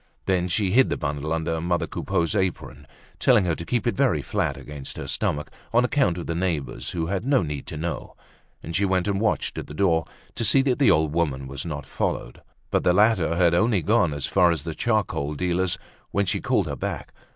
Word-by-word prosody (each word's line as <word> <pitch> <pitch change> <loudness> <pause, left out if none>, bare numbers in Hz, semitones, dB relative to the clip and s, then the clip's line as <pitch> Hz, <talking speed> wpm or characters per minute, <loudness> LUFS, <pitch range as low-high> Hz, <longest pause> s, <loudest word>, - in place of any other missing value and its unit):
Then 90 -2 +1
she 95 +1 0
hid 130 +5 +5
the - - -1
bundle 75 0 -3
under 80 0 -1
mother 85 +1 0
Coupeau's 85 -3 -1
apron, 80 -6 -2 0.3
telling 120 -7 +4
her 85 - +1
to 85 - -5
keep 120 +7 -1
it 120 - +2
very 75 -6 +2
flat - - -1
against 75 -2 -8
her - - -5
stomach, 75 0 -2 0.2
on 120 +2 +4
account 125 - +1
of 85 - -5
the 85 - -2
neighbors 80 -7 -2
who 85 -2 -2
had 95 +3 -2
no 135 -4 +3
need 75 -3 -5
to 85 -3 -6
know; 80 0 -4 0.5
and 85 - -5
she 100 - +2
went 95 -1 +1
and 100 0 0
watched 110 - 0
at - - -7
the 75 - -9
door 80 -3 +2 0.3
to - - -3
see 135 +5 +4
that 130 -3 +1
the 140 - +5
old 80 -1 +3
woman 70 -5 0
was 70 +4 -5
not 75 -3 -5
followed. - - -3 0.3
But - - +2
the 90 - +4
latter 95 -5 +3
had 85 -1 +4
only 100 0 +2
gone 105 -6 +3
as 75 -2 -3
far 90 -2 +4
as 85 - -2
the 80 - -4
charcoal 90 -9 -1
dealer's 90 +2 0 0.3
when 100 0 +1
she 90 - -1
called - - +1
her - - -3
back. - - -5
85 Hz, 220 wpm, -24 LUFS, 80-100 Hz, 0.5 s, hid